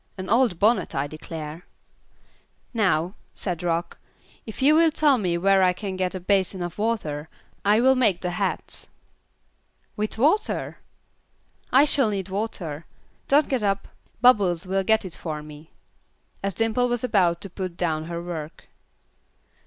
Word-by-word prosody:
An 185 Hz, 0 st, -6 dB
old 235 Hz, -7 st, +3 dB
bonnet, 210 Hz, -1 st, +2 dB
I 135 Hz, +1 st, 0 dB
declare." 155 Hz, +2 st, -7 dB, 1.1 s
"Now," 185 Hz, -6 st, +1 dB, 0.2 s
said 180 Hz, -4 st, -3 dB
Rock, 170 Hz, 0 st, -2 dB, 0.5 s
"if 220 Hz, -, -8 dB
you 280 Hz, +3 st, +5 dB
will 325 Hz, +1 st, +5 dB
tell 295 Hz, -4 st, +3 dB
me 175 Hz, -4 st, 0 dB
where 195 Hz, +2 st, +3 dB
I 180 Hz, -1 st, +4 dB
can 190 Hz, +1 st, -5 dB
get 185 Hz, 0 st, -2 dB
a -, -, -3 dB
basin 190 Hz, 0 st, 0 dB
of 175 Hz, +3 st, -6 dB
water, 160 Hz, -9 st, -2 dB, 0.3 s
I 210 Hz, +3 st, +4 dB
will 265 Hz, +1 st, +5 dB
make 220 Hz, -9 st, +2 dB
the 180 Hz, -, -2 dB
hats." 175 Hz, -, -3 dB, 1.1 s
"With 215 Hz, 0 st, -3 dB
water?" 310 Hz, -, +1 dB, 0.9 s
"I 270 Hz, +3 st, +6 dB
shall 275 Hz, -6 st, +3 dB
need 195 Hz, -2 st, -3 dB
water. 185 Hz, -7 st, -4 dB, 0.4 s
Don't 290 Hz, +2 st, +4 dB
get 260 Hz, -4 st, -1 dB
up 200 Hz, -1 st, -1 dB, 0.3 s
Bubbles 200 Hz, -8 st, +4 dB
will 190 Hz, +1 st, 0 dB
get 220 Hz, +1 st, +2 dB
it 180 Hz, -, -6 dB
for 155 Hz, -3 st, -5 dB
me," 150 Hz, +1 st, -12 dB, 0.7 s
as 195 Hz, -2 st, -2 dB
Dimple 225 Hz, +2 st, +1 dB
was 240 Hz, 0 st, -1 dB
about 180 Hz, -8 st, +2 dB
to 200 Hz, -, -7 dB
put 185 Hz, -2 st, -5 dB
down 160 Hz, -3 st, -1 dB
her 170 Hz, 0 st, -5 dB
work. 160 Hz, -3 st, -7 dB
190 Hz, 155 wpm, -24 LUFS, 170-225 Hz, 1.1 s, I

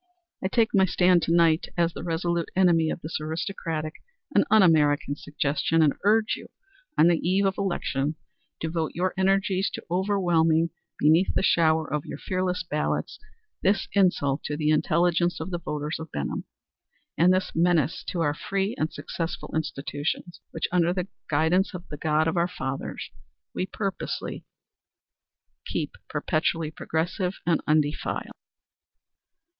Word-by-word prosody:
I -, -, +2 dB
take 225 Hz, +3 st, +2 dB
my 190 Hz, -2 st, +5 dB
stand 180 Hz, -1 st, +4 dB
to 165 Hz, -, 0 dB
night 165 Hz, -1 st, +4 dB
as 170 Hz, -1 st, +2 dB
the -, -, -6 dB
resolute 170 Hz, 0 st, -1 dB
enemy 170 Hz, -4 st, +4 dB
of 170 Hz, -, -4 dB
this 155 Hz, +1 st, -4 dB
aristocratic 160 Hz, 0 st, -4 dB, 0.3 s
and -, -, +5 dB
un 215 Hz, -2 st, +6 dB
American 150 Hz, -4 st, +3 dB
suggestion, 150 Hz, +2 st, 0 dB
and 145 Hz, -, +4 dB
urge 215 Hz, +2 st, +3 dB
you, -, -, -12 dB, 0.5 s
on -, -, +6 dB
the 170 Hz, -2 st, +3 dB
eve 190 Hz, +3 st, +1 dB
of 195 Hz, 0 st, 0 dB
election, 155 Hz, -6 st, -1 dB, 0.5 s
to 160 Hz, -, -1 dB
devote 160 Hz, -1 st, -2 dB
your 180 Hz, +2 st, 0 dB
energies 195 Hz, 0 st, +2 dB
to -, -, -9 dB
overwhelming 175 Hz, -4 st, +2 dB, 0.3 s
beneath 160 Hz, +5 st, +3 dB
the -, -, +2 dB
shower 160 Hz, -3 st, +3 dB
of 150 Hz, -1 st, -2 dB
your -, -, -6 dB
fearless 185 Hz, +1 st, -1 dB
ballots 150 Hz, -2 st, -2 dB, 0.4 s
this 195 Hz, +2 st, +2 dB
insult 170 Hz, -8 st, +2 dB
to 150 Hz, -, -2 dB
the 155 Hz, 0 st, +1 dB
intelligence 175 Hz, +2 st, +2 dB
of 160 Hz, +4 st, -5 dB
the 175 Hz, -, -2 dB
voters 150 Hz, -1 st, -4 dB
of 160 Hz, -1 st, -8 dB
Benham, 70 Hz, -, -3 dB, 0.7 s
and 175 Hz, +2 st, +5 dB
this 185 Hz, 0 st, +1 dB
menace 170 Hz, -2 st, +2 dB
to 175 Hz, -, -2 dB
our 145 Hz, -3 st, +2 dB
free 195 Hz, +6 st, -2 dB
and 155 Hz, +1 st, 0 dB
successful 165 Hz, 0 st, -5 dB
institutions, 155 Hz, +2 st, -3 dB
which, 160 Hz, -, -2 dB
under 175 Hz, -1 st, +3 dB
the 185 Hz, +1 st, -3 dB, 0.2 s
guidance 165 Hz, +6 st, +2 dB
of 180 Hz, 0 st, -8 dB
the 150 Hz, -, -6 dB
God 155 Hz, +1 st, +1 dB
of 170 Hz, +2 st, 0 dB
our 170 Hz, 0 st, +3 dB
fathers, 135 Hz, -6 st, -5 dB, 0.4 s
we 185 Hz, -, -2 dB
purpose 195 Hz, -2 st, -3 dB
to -, -, -6 dB, 1.3 s
keep -, -, -2 dB, 0.2 s
perpetually 160 Hz, -1 st, 0 dB
progressive 180 Hz, +4 st, -2 dB
and 165 Hz, -2 st, +2 dB
undefiled." 150 Hz, -1 st, 0 dB
170 Hz, 150 wpm, -26 LUFS, 155-185 Hz, 1.3 s, un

